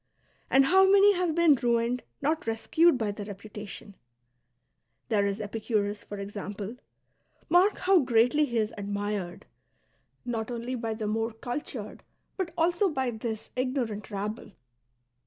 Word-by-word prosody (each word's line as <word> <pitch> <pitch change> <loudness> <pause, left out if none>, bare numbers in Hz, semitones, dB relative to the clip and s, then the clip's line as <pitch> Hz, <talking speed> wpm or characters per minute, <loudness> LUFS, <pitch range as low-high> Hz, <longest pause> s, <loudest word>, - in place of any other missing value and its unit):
And 270 0 +5
how 380 +5 +5
many 400 +1 +7
have 355 -4 0
been 340 -3 +6
ruined, 240 -1 +1 0.2
not 310 -2 0
rescued, 290 +8 +3
by 220 -3 -1
their 205 0 -7
reputation? 205 0 -9 1.2
There 205 -3 +2
is 200 +1 -2
Epicurus, 210 -1 -2
for 205 - -8
example; 205 +2 -6 0.7
mark 370 +4 +4
how 375 0 +4
greatly 250 +3 +3
he 235 -4 -3
is 215 -1 0
admired, 205 -2 -3 0.8
not 230 -2 -3
only 240 +1 -4
by 230 -3 -3
the 215 -1 -4
more 225 +2 -1
cultured, 245 -1 -6 0.3
but 370 -3 -3
also 345 +4 +2
by 265 -5 -1
this 220 -1 -5
ignoi'ant 250 -5 -2
rabble. 210 +1 -5
230 Hz, 135 wpm, -28 LUFS, 210-285 Hz, 1.2 s, many